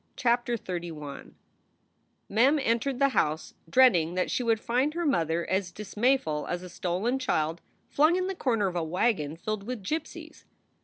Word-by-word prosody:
CHAPTER 240 0 +1
XXXI 170 -7 -7 0.9
MEM 255 +9 +4
entered 260 0 0
the 275 +1 +3
house 155 - 0 0.2
dreading 180 -8 +4
that 185 - 0
she - - 0
would 225 -2 +2
find 255 +7 0
her 345 0 -1
mother 170 - +1
as 190 -1 -1
dismayful 210 - 0
as 175 0 -3
a 180 - -8
stolen 185 +9 -1
child 165 -9 -1 0.3
flung 310 +4 +3
in 370 0 0
the 385 - -2
corner 235 - 0
of 185 -2 -2
a 170 - 0
wagon 160 -2 0
filled 215 +4 -3
with 225 0 -6
gypsies. 315 +10 -5
215 Hz, 160 wpm, -28 LUFS, 170-255 Hz, 0.9 s, MEM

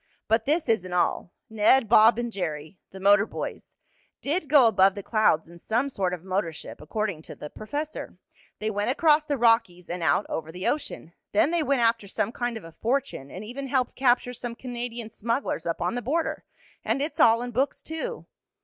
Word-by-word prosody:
"But 225 +1 +2
this 310 +2 +1
isn't 185 -6 0
all. 175 0 0 0.2
Ned, 220 +3 +3
Bob 220 +1 +6
and 240 -1 -2
Jerry 160 -3 -5
the 190 - -11
motor 200 +2 +5
boys - - -7 0.4
did 305 +1 -2
go 285 -4 +7
above 195 -3 +4
the 200 - -6
clouds 215 -9 +2
in 170 +1 -14
some 235 +9 0
sort 190 -8 -1
of 180 -2 -5
motor 190 -2 -1
ship, 155 - -10
according 200 +1 -3
to - - -10
the 150 - -9
professor. 290 +7 -5 0.4
They 215 +1 -2
went 205 +2 -1
across 305 +2 +3
the 290 -2 -1
Rockies, 225 -8 +2
and 175 0 -4
out 165 +5 +2
over 160 0 -4
the 180 +3 -6
ocean. 230 - -3 0.2
Then 240 +9 +3
they 345 -1 +1
went 275 -3 +1
after 230 -3 +2
some 215 - -1
kind 240 -1 -3
of 225 - -10
a 165 - -11
fortune, 240 - -2
and 190 +7 -8
even 270 +5 -6
helped 255 -2 0
capture 250 -1 +2
some 240 -1 -6
Canadian 240 -2 -5
smugglers 230 - -2
up 165 - -2
on 175 - 0
the 245 - -2
border. 315 +8 -2 0.4
And - - 0
it's 295 +2 -3
all 230 -3 +5
in 245 - -5
books, 265 +4 -1
too. 465 +10 -5
225 Hz, 200 wpm, -26 LUFS, 190-260 Hz, 0.4 s, go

